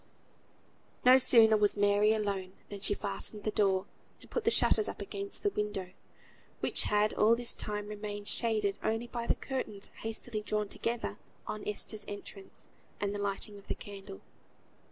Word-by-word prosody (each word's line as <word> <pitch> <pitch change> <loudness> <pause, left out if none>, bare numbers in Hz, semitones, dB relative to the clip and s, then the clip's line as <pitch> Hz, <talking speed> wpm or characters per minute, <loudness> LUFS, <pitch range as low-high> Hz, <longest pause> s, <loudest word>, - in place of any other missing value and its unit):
No 255 +1 +9
sooner 225 -4 +6
was 210 -1 +3
Mary 205 +1 +4
alone 200 -4 -1 0.2
than 205 - -5
she 205 - +3
fastened 205 +1 -4
the 215 - 0
door, 195 -3 +2 0.3
and - - -17
put 475 - -2
the - - +6
shutters 430 -2 +4
up - - -7
against 400 0 -5
the 410 - +2
window, 205 - -3 0.7
which - - +2
had 210 +1 +3
all 220 +2 +5
this 240 0 +2
time 210 0 -4
remained 205 -1 -5
shaded 215 -4 0
only 225 +2 0
by 235 -1 -4
the - - +3
curtains 215 -7 -5
hastily 225 0 -1
drawn 210 -1 -1
together 230 - -2 0.3
on 215 - -4
Esther's 210 0 -1
entrance, 205 -1 -5 0.3
and 200 0 -1
the 205 - -3
lighting 200 +1 -2
of 200 - -19
the - - -1
candle. 195 - -9
210 Hz, 165 wpm, -32 LUFS, 205-225 Hz, 0.7 s, No